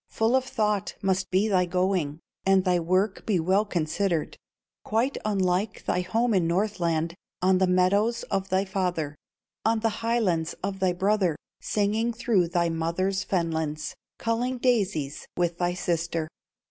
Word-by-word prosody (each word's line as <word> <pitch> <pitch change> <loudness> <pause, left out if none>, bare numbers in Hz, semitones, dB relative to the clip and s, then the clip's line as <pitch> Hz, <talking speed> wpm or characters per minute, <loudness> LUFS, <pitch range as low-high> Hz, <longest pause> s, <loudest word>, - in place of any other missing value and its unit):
"Full 225 +3 +2
of 260 0 +2
thought 210 -5 -1
must 190 -1 +1
be 190 +3 +2
thy 185 -4 +2
going, 180 -4 0 0.2
And 190 0 +3
thy 180 -1 +3
work 185 +4 0
be 200 -5 +1
well 190 +6 +2
considered, 170 -1 -1 0.5
Quite 235 +6 0
unlike 195 -1 0
thy 180 - +1
home 225 +6 +1
in 180 -4 +2
Northland, 170 -3 0 0.3
On 185 0 +4
the 190 - +3
meadows 200 +6 +2
of 195 -1 -1
thy 190 +1 +2
father, 180 -6 -1 0.5
On 225 0 +2
the 225 - +2
highlands 215 -9 +1
of 195 0 -3
thy 185 -2 +2
brother, 190 -2 +1 0.3
Singing 215 +3 0
through 220 -6 +2
thy 170 0 +1
mother's 170 +4 -1
fenlands, 160 -4 -2 0.2
Culling 240 +3 -1
daisies 200 - 0
with 175 -1 0
thy 175 0 0
sister. 170 -2 -1
190 Hz, 145 wpm, -26 LUFS, 170-210 Hz, 0.5 s, On